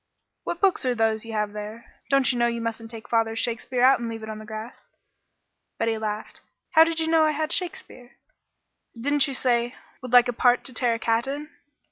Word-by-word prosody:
"What 345 Hz, -, -3 dB
books 390 Hz, -6 st, +3 dB
are 250 Hz, -, +1 dB
those 225 Hz, -1 st, +1 dB
you 225 Hz, -, -7 dB
have 210 Hz, -1 st, -1 dB
there? 210 Hz, +2 st, -9 dB
Don't 275 Hz, -1 st, +3 dB
you 245 Hz, -, -2 dB
know 235 Hz, -, +4 dB
you 235 Hz, 0 st, -2 dB
mustn't 230 Hz, 0 st, -4 dB
take 225 Hz, -1 st, -10 dB
father's 225 Hz, -1 st, +1 dB
Shakespeare 245 Hz, +1 st, -1 dB
out 265 Hz, +1 st, +6 dB
and 235 Hz, -1 st, -4 dB
leave 225 Hz, -1 st, -6 dB
it 220 Hz, -, -7 dB
on 215 Hz, -, -7 dB
the 215 Hz, -, -10 dB
grass?" 220 Hz, +2 st, -8 dB, 0.9 s
Betty 225 Hz, 0 st, 0 dB
laughed. 215 Hz, -1 st, -5 dB, 0.3 s
"How 320 Hz, -2 st, +8 dB
did 330 Hz, 0 st, -1 dB
you 320 Hz, -, 0 dB
know 320 Hz, -1 st, +4 dB
I 310 Hz, -1 st, +2 dB
had 310 Hz, +2 st, -2 dB
Shakespeare?" 340 Hz, -8 st, -4 dB, 0.8 s
"Didn't 285 Hz, +3 st, +2 dB
you 275 Hz, -, -4 dB
say 240 Hz, -2 st, +2 dB
you 240 Hz, -, -8 dB, 0.3 s
'Would 255 Hz, -, -7 dB
like 245 Hz, 0 st, +7 dB
a 245 Hz, -, -1 dB
part 245 Hz, +1 st, +3 dB
to 260 Hz, -, -6 dB
tear 235 Hz, 0 st, +1 dB
a -, -, -3 dB
cat 230 Hz, +2 st, 0 dB
in'?" 295 Hz, +3 st, -5 dB
240 Hz, 220 wpm, -25 LUFS, 225-275 Hz, 0.9 s, How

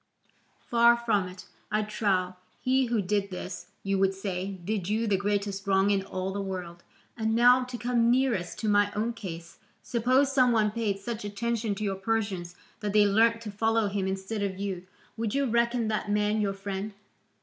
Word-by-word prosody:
Far 235 Hz, 0 st, +5 dB
from 215 Hz, -6 st, +1 dB
it, 180 Hz, 0 st, -11 dB, 0.3 s
I 215 Hz, 0 st, +1 dB
trow; 195 Hz, -4 st, 0 dB, 0.2 s
he 260 Hz, +1 st, +2 dB
who 230 Hz, -3 st, 0 dB
did 200 Hz, +1 st, 0 dB
this, 180 Hz, -1 st, -6 dB, 0.2 s
you 195 Hz, 0 st, 0 dB
would 195 Hz, 0 st, +2 dB
say, 195 Hz, 0 st, -3 dB
did 200 Hz, -2 st, -2 dB
you 220 Hz, +2 st, +1 dB
the 205 Hz, -3 st, +2 dB
greatest 200 Hz, 0 st, -1 dB
wrong 195 Hz, +1 st, +3 dB
in 200 Hz, -1 st, +2 dB
all 190 Hz, 0 st, -4 dB
the 200 Hz, -, -2 dB
world. 180 Hz, -3 st, -6 dB, 0.3 s
And 220 Hz, -1 st, 0 dB
now, 245 Hz, +2 st, +6 dB
to 250 Hz, -1 st, -6 dB
come 235 Hz, -1 st, +2 dB
nearest 240 Hz, -9 st, +1 dB
to 220 Hz, -, -1 dB
my 205 Hz, 0 st, +3 dB
own 225 Hz, +3 st, 0 dB
case, 170 Hz, -6 st, -8 dB, 0.2 s
suppose 255 Hz, +3 st, +2 dB
some 255 Hz, -2 st, +5 dB
one 215 Hz, -2 st, +3 dB
paid 215 Hz, -3 st, -1 dB
such 215 Hz, +2 st, -5 dB
attention 220 Hz, +1 st, -2 dB
to 215 Hz, -, -5 dB
your 195 Hz, -2 st, -1 dB
Persians 195 Hz, -4 st, -2 dB, 0.2 s
that 205 Hz, -1 st, -3 dB
they 210 Hz, -1 st, +6 dB
learnt 225 Hz, +3 st, +3 dB
to 215 Hz, -2 st, -6 dB
follow 225 Hz, 0 st, +1 dB
him 195 Hz, -1 st, -1 dB
instead 195 Hz, +3 st, -3 dB
of 195 Hz, -2 st, -2 dB
you, 190 Hz, -2 st, -4 dB, 0.3 s
would 225 Hz, 0 st, -2 dB
you 280 Hz, 0 st, +2 dB
reckon 235 Hz, -1 st, +1 dB
that 215 Hz, -1 st, -2 dB
man 210 Hz, +1 st, +1 dB
your 200 Hz, -1 st, 0 dB
friend? 195 Hz, +1 st, -5 dB
210 Hz, 190 wpm, -28 LUFS, 195-230 Hz, 0.3 s, now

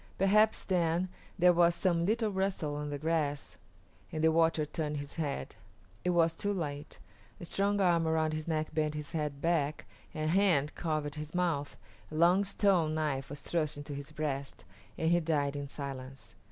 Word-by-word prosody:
Perhaps 210 Hz, +3 st, +4 dB
then 175 Hz, 0 st, +1 dB, 0.3 s
there 180 Hz, -1 st, +6 dB
was 170 Hz, 0 st, +4 dB
some 170 Hz, -2 st, +1 dB
little 220 Hz, 0 st, +1 dB
rustle 190 Hz, -6 st, -1 dB
of 150 Hz, -, -4 dB
the 145 Hz, -, -3 dB
grass, 150 Hz, -2 st, -2 dB, 0.5 s
and 160 Hz, -2 st, -3 dB
the 160 Hz, -, +5 dB
watcher 165 Hz, -1 st, +3 dB
turned 150 Hz, 0 st, -3 dB
his 145 Hz, 0 st, -6 dB
head. 140 Hz, -, -3 dB, 0.5 s
It -, -, +1 dB
was 165 Hz, -2 st, +3 dB
too 205 Hz, +4 st, -1 dB
late. 145 Hz, -4 st, -5 dB, 0.4 s
A -, -, -7 dB
strong 200 Hz, +3 st, 0 dB
arm 170 Hz, -4 st, +3 dB
around 160 Hz, -1 st, +1 dB
his 155 Hz, +1 st, -4 dB
neck 155 Hz, -1 st, -1 dB
bent 155 Hz, -1 st, 0 dB
his 150 Hz, -1 st, -5 dB
head 150 Hz, -4 st, -3 dB
back, 155 Hz, -3 st, 0 dB, 0.3 s
a 155 Hz, -, -2 dB
hand 160 Hz, -4 st, +3 dB
covered 155 Hz, -3 st, -2 dB
his 150 Hz, +2 st, -6 dB
mouth, 165 Hz, -6 st, -1 dB, 0.3 s
a 155 Hz, -, -8 dB
long 175 Hz, +5 st, +5 dB
stone 190 Hz, -5 st, +2 dB
knife 140 Hz, -4 st, -1 dB
was 145 Hz, +1 st, -6 dB
thrust 155 Hz, -3 st, -1 dB
into 145 Hz, 0 st, -7 dB
his 140 Hz, +1 st, -7 dB
breast, 140 Hz, -3 st, -4 dB, 0.3 s
and 160 Hz, +1 st, +1 dB
he 175 Hz, -, +5 dB
died 150 Hz, -4 st, 0 dB
in 145 Hz, 0 st, -4 dB
silence. 135 Hz, -1 st, -7 dB
155 Hz, 180 wpm, -31 LUFS, 145-175 Hz, 0.5 s, there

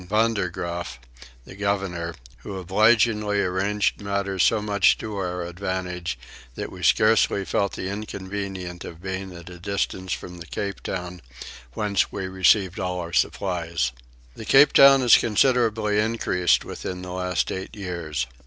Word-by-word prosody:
Vander 110 Hz, -3 st, +1 dB
Graaf, 85 Hz, -3 st, -5 dB, 0.5 s
the -, -, -11 dB
governor, 95 Hz, -4 st, -2 dB, 0.2 s
who 95 Hz, +9 st, -7 dB
obligingly 105 Hz, +2 st, +3 dB
arranged 100 Hz, +4 st, 0 dB
matters 100 Hz, -2 st, -1 dB
so 110 Hz, -, +4 dB
much 105 Hz, -1 st, +3 dB
to 110 Hz, -1 st, -6 dB
our 90 Hz, -2 st, -3 dB
advantage 90 Hz, -2 st, -4 dB, 0.4 s
that -, -, -5 dB
we 90 Hz, -, -10 dB
scarcely 100 Hz, +5 st, +3 dB
felt 100 Hz, +1 st, 0 dB
the 95 Hz, -, -4 dB
inconvenience 95 Hz, -3 st, -5 dB
of 80 Hz, -, -9 dB
being 95 Hz, +1 st, -5 dB
at 85 Hz, -1 st, -11 dB
a 90 Hz, -1 st, -10 dB
distance 95 Hz, -1 st, -3 dB
from 90 Hz, -1 st, -5 dB
the 85 Hz, -, -10 dB
Cape 100 Hz, +1 st, -4 dB
Town, 90 Hz, -1 st, -5 dB, 0.5 s
whence 100 Hz, +2 st, 0 dB
we 95 Hz, -2 st, -4 dB
received 95 Hz, +1 st, +2 dB
all 90 Hz, -1 st, -2 dB
our 85 Hz, -1 st, -6 dB
supplies. 85 Hz, -8 st, 0 dB, 0.4 s
The -, -, -8 dB
Cape 135 Hz, +6 st, +6 dB
Town 135 Hz, -1 st, +8 dB
is 120 Hz, -, +8 dB
considerably 110 Hz, -2 st, +2 dB
increased 105 Hz, -6 st, +1 dB
within 90 Hz, 0 st, -6 dB
the 90 Hz, -, -7 dB
last 90 Hz, 0 st, -1 dB
eight 95 Hz, 0 st, -6 dB
years. 85 Hz, -, -3 dB
95 Hz, 145 wpm, -24 LUFS, 90-105 Hz, 0.5 s, Town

